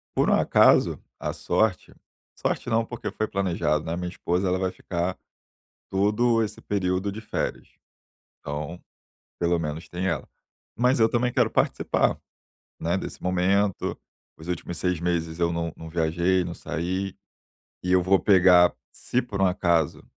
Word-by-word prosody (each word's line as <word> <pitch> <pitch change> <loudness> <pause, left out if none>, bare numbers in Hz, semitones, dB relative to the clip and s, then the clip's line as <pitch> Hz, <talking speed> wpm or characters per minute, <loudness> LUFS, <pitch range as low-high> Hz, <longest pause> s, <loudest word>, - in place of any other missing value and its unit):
Por - - +3
um - - +4
acaso, - - +4 0.2
a - - -3
sorte, 110 -4 0 0.4
sorte - - -2
não, 115 0 +2
porque 120 - -5
foi 110 - -2
planejado. 90 -6 0
Né, 80 - -2
a - - -3
minha 90 0 -3
esposa, 90 +1 -1
ela 90 0 +1
vai 95 -1 0
ficar 90 0 -3 0.7
todo 110 +4 +2
esse 105 - -4
período 95 0 -1
de 110 - -7
férias. 110 - -3 0.7
Então, 75 +4 -5 0.6
pelo 85 0 +2
menos, 80 0 -4
tem 90 +2 -3
ela. 85 - -2 0.5
Mas 125 +2 +3
eu 110 - +6
também 125 +1 +1
quero - - +2
participar, - - +1 0.6
né, - - 0
desse - - -6
momento. 95 +2 +1 0.4
Os 80 +2 -11
últimos 90 -1 -4
6 90 -2 0
meses 85 -2 -1
eu 85 -1 +1
não 85 -1 -2
não 80 0 -9
viajei, 85 +3 +1
não 85 - -5
saí. 95 +4 -3 0.7
E 90 - -2
eu 90 -1 +5
vou 95 +2 +4
pegar 90 -3 +6 0.2
se 125 - -1
por 105 -5 -5
um 95 - +5
acaso 85 -4 +1
90 Hz, 160 wpm, -25 LUFS, 85-100 Hz, 0.7 s, eu